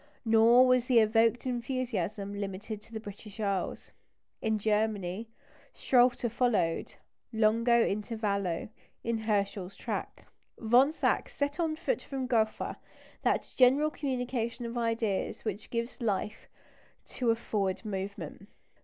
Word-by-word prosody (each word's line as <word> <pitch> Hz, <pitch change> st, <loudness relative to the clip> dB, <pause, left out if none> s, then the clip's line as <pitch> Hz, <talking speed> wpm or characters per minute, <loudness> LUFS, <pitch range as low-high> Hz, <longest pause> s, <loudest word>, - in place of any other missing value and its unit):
Nor 230 Hz, +3 st, +6 dB
was 255 Hz, -1 st, +3 dB
the 250 Hz, -2 st, +3 dB
evoked 225 Hz, +2 st, +4 dB
enthusiasm 235 Hz, -6 st, -2 dB
limited 200 Hz, +1 st, -5 dB
to 225 Hz, -, -19 dB
the 220 Hz, -, -4 dB
British 210 Hz, 0 st, -10 dB
Isles. 200 Hz, -3 st, -2 dB, 0.5 s
In 220 Hz, -1 st, +1 dB
Germany, 210 Hz, -1 st, -1 dB, 0.5 s
Schröter 245 Hz, -2 st, +3 dB
followed 225 Hz, -9 st, 0 dB, 0.4 s
longo 230 Hz, +1 st, +3 dB
intervallo 200 Hz, -4 st, -2 dB, 0.3 s
in 230 Hz, -1 st, -1 dB
Herschel's 200 Hz, -3 st, -1 dB
track. -, -, -5 dB, 0.3 s
Von 245 Hz, +6 st, +4 dB
Zach 320 Hz, -, 0 dB
set 285 Hz, +3 st, -2 dB
on 320 Hz, -2 st, +1 dB
foot 400 Hz, +10 st, -1 dB
from 270 Hz, -2 st, -4 dB
Gotha 225 Hz, -4 st, 0 dB, 0.4 s
that -, -, 0 dB
general 270 Hz, +4 st, +5 dB
communication 245 Hz, -4 st, -3 dB
of 235 Hz, +1 st, -5 dB
ideas 230 Hz, -4 st, -1 dB
which 210 Hz, -1 st, -4 dB
gives 235 Hz, +2 st, -3 dB
life 210 Hz, -1 st, -2 dB, 0.6 s
to 245 Hz, -2 st, -2 dB
a 225 Hz, -, +4 dB
forward 205 Hz, -3 st, -2 dB
movement. 195 Hz, -2 st, -5 dB
225 Hz, 120 wpm, -30 LUFS, 205-245 Hz, 0.6 s, Nor